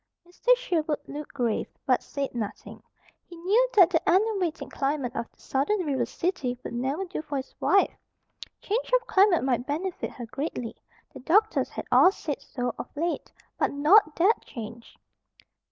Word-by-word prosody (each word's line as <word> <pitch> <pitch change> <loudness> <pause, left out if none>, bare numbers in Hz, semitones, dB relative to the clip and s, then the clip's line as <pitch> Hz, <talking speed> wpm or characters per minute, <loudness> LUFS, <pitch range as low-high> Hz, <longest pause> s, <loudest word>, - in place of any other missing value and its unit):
Mr. 485 +8 +3
Sherwood 325 -11 -1
looked 295 0 -8
grave, 240 -5 0 0.2
but 255 -2 +3
said 280 -1 -4
nothing. 225 -4 -6 0.4
He 345 - -13
knew 410 +9 +2
that 370 -3 +7
the 330 - +1
enervating 375 -4 +1
climate 275 -2 -2
of 235 - -3
the - - -36
Southern 295 +10 0
river 265 -5 0
city 265 -4 -2
would - - -6
never 270 +10 -2
do 360 -3 -5
for 295 -2 -4
his 265 - -6
wife. 395 - +3 0.7
Change 460 +5 -2
of 470 - -25
climate 385 -5 +4
might 250 -2 0
benefit 340 +5 -3
her 240 - -8
greatly; 250 -2 -4 0.4
the - - -9
doctors 420 - +2
had - - -6
all 370 - +7
said 300 -6 -5
so 245 -2 -3
of - - -6
late; 335 +3 -2 0.3
but - - +2
not 305 +4 +5
that 390 +7 +3
change. 230 -1 -9
305 Hz, 165 wpm, -27 LUFS, 265-380 Hz, 0.7 s, that